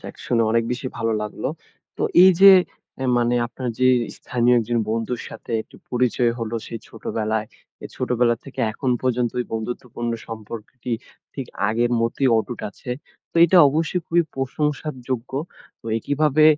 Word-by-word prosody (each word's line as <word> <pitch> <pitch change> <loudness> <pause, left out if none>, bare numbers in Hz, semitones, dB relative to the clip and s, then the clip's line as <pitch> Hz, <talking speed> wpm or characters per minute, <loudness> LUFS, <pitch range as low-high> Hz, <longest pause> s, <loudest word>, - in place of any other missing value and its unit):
যাক - - -9
শুনে 115 -2 +2
অনেক 115 0 +2
বেশি 130 +1 -4
ভালো 115 -1 0
লাগলো। 105 - -4 0.5
তো - - -3 0.2
এই 190 - +9
যে 195 0 +11 0.5
অ্যা 130 - -3
মানে 120 0 +2
আপনার 125 +1 -5
যেই 130 0 +5 0.2
স্থানীয় 125 0 +2
একজন 115 +1 0
বন্ধুর 115 +2 -2
সাথে - - -11
একটু - - -18
পরিচয় 125 -1 +2
হলো, 115 0 -3
সেই 115 - -6
ছোটবেলায়। 110 -1 -2 0.4
এ - - -3
ছোটবেলা 120 -1 +2
থেকে 135 - -7
এখন 130 +3 -2
পর্যন্ত, 125 -2 +1
এই 125 - -3
বন্ধুত্বপূর্ণ 120 +1 -4 0.2
সম্পর্কটি 115 +2 -7 0.4
ঠিক 135 -3 -5 0.2
আগের 120 +2 +1
মতেই 115 +4 +1
অটুট 115 +1 -4
আছে। 125 - -9 0.4
তো - - -52
এইটা 180 +2 +5
অবশ্যই 160 +5 0
খুবই 170 +1 +3
প্রশংসার 150 +2 -2
যোগ্য। 125 -2 -2 0.6
ওই 110 0 0
কিভাবে 150 +1 +3
120 Hz, 155 wpm, -22 LUFS, 115-130 Hz, 0.6 s, যে